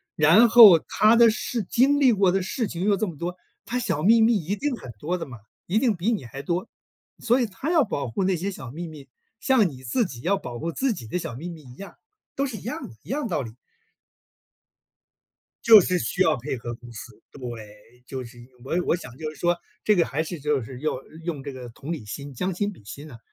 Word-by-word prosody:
然 165 Hz, +10 st, +6 dB
后 215 Hz, -8 st, +10 dB
它 215 Hz, +7 st, +3 dB
的 235 Hz, -1 st, +7 dB
事 230 Hz, +1 st, -2 dB
经 275 Hz, +7 st, +3 dB
历 260 Hz, -4 st, +5 dB
过 195 Hz, -3 st, +3 dB
的 195 Hz, 0 st, +1 dB
事 220 Hz, +5 st, -2 dB
情 175 Hz, 0 st, -5 dB
又 205 Hz, -1 st, +4 dB
这 215 Hz, -, 0 dB
么 160 Hz, -5 st, -7 dB
多， 175 Hz, +2 st, -4 dB, 0.3 s
它 245 Hz, -, -3 dB
小 195 Hz, -11 st, -1 dB
秘 225 Hz, +3 st, +6 dB
密 225 Hz, -1 st, +4 dB
一 190 Hz, +4 st, -2 dB
定 290 Hz, +4 st, -2 dB
很 130 Hz, -, -11 dB
多 180 Hz, +4 st, -2 dB
的 165 Hz, -, -5 dB
嘛， 120 Hz, -3 st, -10 dB, 0.3 s
一 195 Hz, +5 st, +1 dB
定 230 Hz, -6 st, +2 dB
比 190 Hz, +7 st, 0 dB
你 205 Hz, -, -2 dB
还 135 Hz, +4 st, -8 dB
多， 175 Hz, +8 st, -2 dB, 0.5 s
所 245 Hz, +2 st, +2 dB
以 -, -, +2 dB
它 230 Hz, +10 st, -5 dB
要 320 Hz, -5 st, +4 dB
保 140 Hz, -, -3 dB
护 155 Hz, +12 st, -2 dB
那 185 Hz, -2 st, +1 dB
些 195 Hz, +5 st, -3 dB
小 130 Hz, -9 st, -9 dB
秘 170 Hz, +3 st, -6 dB
密， 145 Hz, -4 st, -12 dB, 0.3 s
像 240 Hz, -9 st, +3 dB
你 130 Hz, -2 st, -12 dB
自 200 Hz, -, 0 dB
己 125 Hz, -8 st, -8 dB
要 195 Hz, +5 st, +1 dB
保 120 Hz, -9 st, -7 dB
护 170 Hz, -, -3 dB
自 265 Hz, +2 st, 0 dB
己 120 Hz, -, -9 dB
的 180 Hz, -, -2 dB
小 120 Hz, -, -6 dB
秘 170 Hz, +7 st, -6 dB
密 160 Hz, -3 st, -10 dB
一 125 Hz, -1 st, -14 dB
样， 200 Hz, +4 st, -10 dB, 0.4 s
都 275 Hz, -, 0 dB
是 240 Hz, -, -6 dB
一 -, -, -10 dB
样 240 Hz, -, -5 dB
的 115 Hz, -, -14 dB
一 -, -, -17 dB
样 295 Hz, +3 st, -1 dB
的 -, -, -2 dB
道 165 Hz, -, -1 dB
理。 115 Hz, -3 st, -7 dB, 2.1 s
就 220 Hz, -3 st, +10 dB
是 180 Hz, 0 st, 0 dB
需 190 Hz, +2 st, 0 dB
要 160 Hz, -5 st, +3 dB
配 130 Hz, +2 st, -4 dB
合 120 Hz, 0 st, -6 dB
公 120 Hz, 0 st, -13 dB
司， 110 Hz, -1 st, -11 dB
对， 115 Hz, -2 st, -10 dB
就 130 Hz, -1 st, -6 dB
是 120 Hz, +1 st, -13 dB
因 120 Hz, -, -13 dB, 0.2 s
为 170 Hz, +6 st, 0 dB
我 -, -, -5 dB
我 -, -, +3 dB
想 125 Hz, -7 st, -11 dB
就 155 Hz, 0 st, -5 dB
是 155 Hz, -, -14 dB
说， 175 Hz, +3 st, +1 dB, 0.3 s
这 210 Hz, -2 st, +4 dB
个 170 Hz, -, +3 dB
还 150 Hz, +4 st, -2 dB
是 165 Hz, -1 st, -6 dB
就 145 Hz, -3 st, 0 dB
是 125 Hz, +2 st, -9 dB
用 155 Hz, -4 st, -1 dB, 0.3 s
用 155 Hz, -6 st, -4 dB
这 140 Hz, -1 st, -6 dB
个 125 Hz, -2 st, -9 dB
同 140 Hz, +7 st, -7 dB
理 145 Hz, -10 st, -5 dB
心， 140 Hz, +7 st, -7 dB
将 180 Hz, +7 st, -2 dB
心 205 Hz, +3 st, -2 dB
比 105 Hz, -, -17 dB
心 145 Hz, +7 st, -10 dB
啊， 115 Hz, -, -11 dB
170 Hz, 265 characters per minute, -24 LUFS, 130-210 Hz, 2.1 s, 后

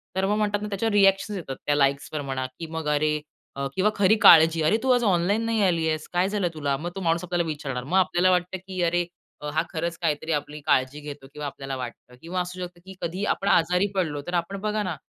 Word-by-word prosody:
तर 190 Hz, 0 st, +1 dB
मग 210 Hz, +2 st, +1 dB
म्हणतात 205 Hz, -1 st, 0 dB
ना 210 Hz, -, -3 dB
त्याच्यावर 210 Hz, +2 st, -1 dB
रिएक्शन्स 195 Hz, 0 st, +3 dB
येतात. 135 Hz, -6 st, -6 dB
त्या 145 Hz, -, +2 dB
लाइक्सवर 140 Hz, +1 st, 0 dB
म्हणा 135 Hz, -1 st, -3 dB
की 165 Hz, -, -4 dB
मग 160 Hz, -2 st, -3 dB
अरे, 150 Hz, +1 st, +2 dB, 0.4 s
अ, 140 Hz, 0 st, -2 dB
किंवा 205 Hz, +3 st, +2 dB
खरी 200 Hz, +1 st, +4 dB
काळजी. 160 Hz, 0 st, +7 dB
"अरे 160 Hz, +8 st, +3 dB
तू 260 Hz, -, +3 dB
आज 245 Hz, -1 st, +3 dB
ऑनलाईन 200 Hz, +2 st, +2 dB
नाही 225 Hz, -2 st, +1 dB
आलीयेस? 160 Hz, -4 st, 0 dB
काय 180 Hz, +2 st, +2 dB
झालं 200 Hz, -3 st, 0 dB
तुला?" 145 Hz, -3 st, -1 dB
मग 170 Hz, +5 st, -5 dB
तो 195 Hz, -, -5 dB
माणूस 170 Hz, 0 st, +1 dB
आपल्याला 175 Hz, -1 st, 0 dB
विचारणार. 135 Hz, -5 st, -4 dB
मग 175 Hz, +8 st, 0 dB
आपल्याला 185 Hz, 0 st, +3 dB
वाटतं, 180 Hz, +1 st, 0 dB
की 185 Hz, -2 st, -4 dB
अरे, 175 Hz, +1 st, +1 dB, 0.4 s
अ, 150 Hz, -, -4 dB
हा 155 Hz, -, +2 dB
खरंच 170 Hz, +1 st, -2 dB
काहीतरी 150 Hz, +2 st, -1 dB
आपली 150 Hz, +1 st, -11 dB
काळजी 130 Hz, 0 st, +1 dB
घेतो 145 Hz, -2 st, -9 dB
किंवा 150 Hz, 0 st, -6 dB
आपल्याला 135 Hz, -1 st, -6 dB
वाटतं. 125 Hz, 0 st, -8 dB
किंवा 180 Hz, +2 st, -2 dB
असू 180 Hz, +1 st, -6 dB
शकतं 175 Hz, -1 st, -14 dB
की 190 Hz, 0 st, -10 dB
कधीही 185 Hz, +5 st, -2 dB
आपण 200 Hz, -, -5 dB
आजारी 180 Hz, +4 st, +3 dB
पडलो, 155 Hz, -6 st, -1 dB
तर 175 Hz, -, -4 dB
आपण 195 Hz, +3 st, -8 dB
बघा 210 Hz, 0 st, -1 dB
ना, 180 Hz, -4 st, -3 dB
175 Hz, 230 wpm, -25 LUFS, 150-190 Hz, 0.4 s, काळजी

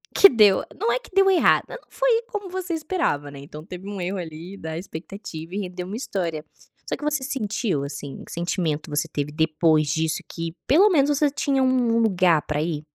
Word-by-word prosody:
que 395 Hz, -, +10 dB
deu 210 Hz, -5 st, +5 dB, 0.2 s
não 450 Hz, +3 st, +1 dB
é -, -, +2 dB
que -, -, -17 dB
deu 390 Hz, 0 st, +6 dB
errado, 370 Hz, -, +4 dB
só -, -, -10 dB
não -, -, -23 dB
foi -, -, +2 dB
como 410 Hz, -6 st, -5 dB
você 370 Hz, -1 st, -4 dB
esperava, 310 Hz, -, -1 dB
né, 140 Hz, -, -10 dB
então 150 Hz, +2 st, -10 dB
teve 185 Hz, +1 st, -9 dB
um 200 Hz, -2 st, -5 dB
erro 190 Hz, +3 st, -2 dB
ali 170 Hz, +3 st, -7 dB
da 160 Hz, -3 st, -6 dB
expectativa 175 Hz, -1 st, -8 dB
e 205 Hz, -, -1 dB
rendeu 180 Hz, -2 st, -5 dB
uma 205 Hz, -, -5 dB
história. 170 Hz, -, -3 dB, 0.5 s
Só -, -, -1 dB
que -, -, -11 dB
você 300 Hz, -3 st, 0 dB
sentiu, 215 Hz, -, -1 dB
assim, 140 Hz, -1 st, -7 dB
que -, -, -11 dB
sentimento 170 Hz, -3 st, -2 dB
você 150 Hz, +2 st, -1 dB
teve 145 Hz, -1 st, -3 dB
depois 155 Hz, -1 st, +2 dB
disso 160 Hz, +2 st, 0 dB
que 165 Hz, -1 st, -5 dB
pelo 370 Hz, +10 st, +6 dB
menos 285 Hz, -6 st, +4 dB
você 290 Hz, 0 st, +3 dB
tinha 275 Hz, -1 st, +1 dB
um 255 Hz, -2 st, +2 dB
um -, -, +3 dB
lugar 180 Hz, -7 st, +3 dB
para 150 Hz, 0 st, -1 dB
ir? 155 Hz, -2 st, -2 dB
185 Hz, 215 wpm, -24 LUFS, -, 0.5 s, que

